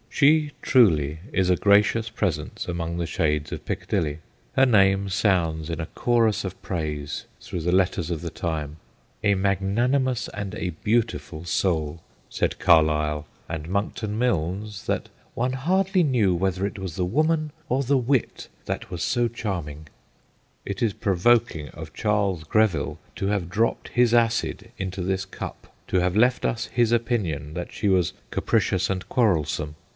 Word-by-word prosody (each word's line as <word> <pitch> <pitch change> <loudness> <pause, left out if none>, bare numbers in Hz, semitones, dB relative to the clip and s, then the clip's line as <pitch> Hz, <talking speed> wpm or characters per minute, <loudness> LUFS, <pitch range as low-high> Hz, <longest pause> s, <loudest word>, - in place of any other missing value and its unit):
She, 150 +1 +4
truly, 80 - +4
is 95 -1 +1
a 90 - +5
gracious 105 +3 +3
presence 85 -9 -2
among 85 -1 -3
the 85 - -1
shades 75 -3 0
of - - -6
Piccadilly. 75 -1 -2 0.4
Her 135 - +6
name 100 -4 +4
sounds 90 -6 +1
in 85 -1 -3
a 80 - -2
chorus 115 -3 +1
of 95 - -6
praise 75 -4 -4
through 90 - -5
the 90 +2 0
letters 90 -2 +1
of 80 -2 -2
the 85 - -4
time. 80 -3 -3 0.2
' - - -37
A 100 -1 +4
magnanimous 115 +7 +1
and 100 -1 -5
a 90 -4 -2
beautiful 110 -8 0
soul/ 80 -3 0 0.3
said - - -1
Carlyle; 75 -2 +3 0.2
andMonckton 95 +7 -2
Milnes, 100 -2 -1
that - - -2 0.2
' - - -34
one 130 +1 0
hardly 185 +7 +2
knew 115 - +2
whether 95 +2 0
it 100 - -4
was 95 -4 -5
the 90 - 0
woman 155 - +1 0.2
or 130 +2 +2
the 135 +2 +2
wit 130 0 0 0.2
that - - -4
was 85 -2 -3
so 120 -1 +2
charming/ 85 -10 -5 0.8
It 100 -1 -4
is 115 -4 +2
provoking 100 - +2
of 80 +3 -10
Charles 100 -6 0
Greville 80 -5 +1 0.2
to 95 - -2
have 100 -4 -1
dropped 110 +5 0
his 120 -1 +3
acid 115 -1 +1
into 95 -2 -4
this 95 +1 -1
cup, 95 - -8
to 95 - +2
have 90 +1 +1
left 125 +3 +3
us 115 - 0
his 120 -2 +1
opinion 100 - 0
that 90 +1 -5
she 105 - -2
was 95 -3 +2 0.2
capricious 95 0 +1
and 95 0 -2
quarrelsome. 75 - +1
95 Hz, 160 wpm, -25 LUFS, 85-115 Hz, 0.8 s, Her